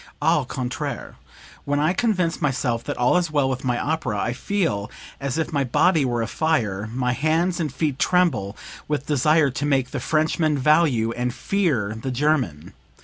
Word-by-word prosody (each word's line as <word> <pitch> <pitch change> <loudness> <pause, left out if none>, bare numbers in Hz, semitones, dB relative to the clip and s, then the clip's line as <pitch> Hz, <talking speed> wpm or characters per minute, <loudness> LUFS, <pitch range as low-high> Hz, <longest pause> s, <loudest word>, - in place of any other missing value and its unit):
Au - - +2
contraire 130 +1 -4 0.5
when 145 0 0
I 155 +4 +2
convince 185 -7 0
myself 130 -5 0
that - - -4
all 125 +8 +3
is 175 -2 0
well 145 -3 +1
with 130 -1 -3
my 125 -2 0
opera, 150 -9 -1
I 120 - -1
feel 120 - -1 0.3
as 140 +1 -3
if 160 0 -2
my 140 -1 +2
body 155 +4 +3
were 120 -2 0
afire 110 -7 -1
my 125 0 0
hands 160 +7 +1
and 155 -4 -1
feet 140 0 -2
tremble 140 - +1 0.3
with 150 -1 -2
desire 150 +1 +3
to 140 +3 -4
make 135 -3 +1
the - - -3
Frenchman 155 -1 +1
value 135 -5 +3
and 125 +1 -2
fear 145 - 0
the 135 - -3
German. 125 - -1
140 Hz, 170 wpm, -23 LUFS, 120-160 Hz, 0.5 s, all